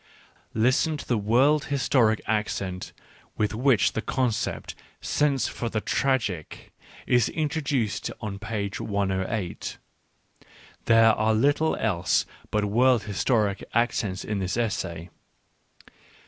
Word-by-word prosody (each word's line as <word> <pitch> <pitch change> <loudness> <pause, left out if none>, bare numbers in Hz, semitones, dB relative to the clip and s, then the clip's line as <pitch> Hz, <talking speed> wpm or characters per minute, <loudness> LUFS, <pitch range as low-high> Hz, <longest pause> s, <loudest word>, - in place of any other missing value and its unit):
Listen 130 +7 +2
to - - -8
the 120 - +2
world 130 +8 +3
historic 130 -6 +2
accent 100 -4 -2 0.5
with 105 0 0
which 120 -1 +3
the 110 - -2
concept 120 -3 -2 0.2
" - - -38 0.2
sense 145 -3 +2
for 120 - -4
the 110 - -1
tragic 105 - -2 0.2
" - - -20
is 120 -3 +3
introduced 145 - -1
on 100 -3 -5
page 100 -3 -4
1 100 -2 -1
80: 95 -1 -3 1.1
there 115 -1 +6
are 110 +1 +1
little 145 +7 +2
else 95 -6 +1 0.2
but 105 -1 0
world 120 +2 +3
historic 105 -1 0
accents 115 -5 0
in 105 -2 -2
this 95 +3 -2
essay. 90 -7 -3
110 Hz, 120 wpm, -26 LUFS, 100-130 Hz, 1.1 s, there